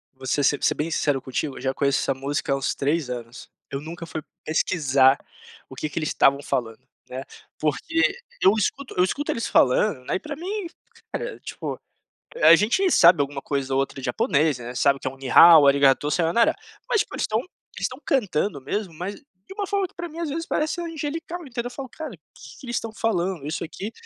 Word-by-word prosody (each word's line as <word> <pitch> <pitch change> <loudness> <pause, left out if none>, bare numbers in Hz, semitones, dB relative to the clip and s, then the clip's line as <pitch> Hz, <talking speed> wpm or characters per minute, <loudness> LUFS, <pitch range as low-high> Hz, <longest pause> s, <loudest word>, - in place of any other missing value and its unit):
Vou 130 0 -11
ser 140 +2 +1
ser 145 - +2
ser - - +4
bem 155 +2 -2
sincero 145 -4 0
contigo, 130 +2 -3
eu - - -8
já 130 0 -1
conheço 140 -1 +1
essa - - 0
música 140 +1 -2
há - - +2
uns 135 0 -1
3 145 -1 0
anos. 120 -1 -7 0.2
Eu 135 0 -4
nunca 170 +3 -7
fui 160 -1 -5 0.2
pesquisar 140 -5 +3 0.5
o 130 - -10
que 150 +4 -3
que 150 - -3
eles 155 - -2
estavam 140 +1 +3
falando, 120 -6 -3 0.3
né, 130 +1 -5 0.4
porque 330 - 0 0.4
eu 190 - +6
escuto 260 +6 -2
eu 180 - +5
escuto 285 +10 -1
eles 230 - -2
falando, 130 +2 +3
né, - - -1
e - - 0
pra 295 +4 -6
mim, 380 +4 -4 0.5
cara, - - -4
tipo, - - -6 0.6
eh, 485 - -2
a 170 - +10
gente 245 - +2
sabe 170 - +6
alguma 140 0 -4
coisa 135 -1 -3
ou 135 - +3
outra 135 0 -3
de - - -10
japonês, 140 +3 +1
né, 120 +1 -7
sabe 140 +3 +3
o - - -37
que - - -7
é - - -6
um 135 - -13
“你 135 -1 -6
好”, 165 0 +9
“arigatō, 140 +1 +4
sayonara”. 170 +8 +3 0.3
Mas, 435 - +2
tipo, 420 - -3
eles - - -2
estão 215 +1 0
eles 365 - -11
estão - - -8
cantando 200 - 0
mesmo, 190 +4 -4
mas 180 +6 -5
de 200 - -18
uma 405 0 -3
forma 395 -1 0
que, - - -26
para 345 -1 -6
mim, 320 - -11
às 335 -2 -2
vezes 330 +3 -3
parece 310 +3 -1
angelical, 330 +1 -5
entendeu? 245 -2 -4
Eu - - -13
falo: 265 +1 -7
"Cara, 310 0 -7
o - - -13
que - - -37 0.4
que - - -11
eles 240 -1 -2
estão 225 - -3
falando? 185 -8 -1
Isso 155 - -3
aqui 200 +6 -7
165 Hz, 225 wpm, -24 LUFS, -, 0.6 s, a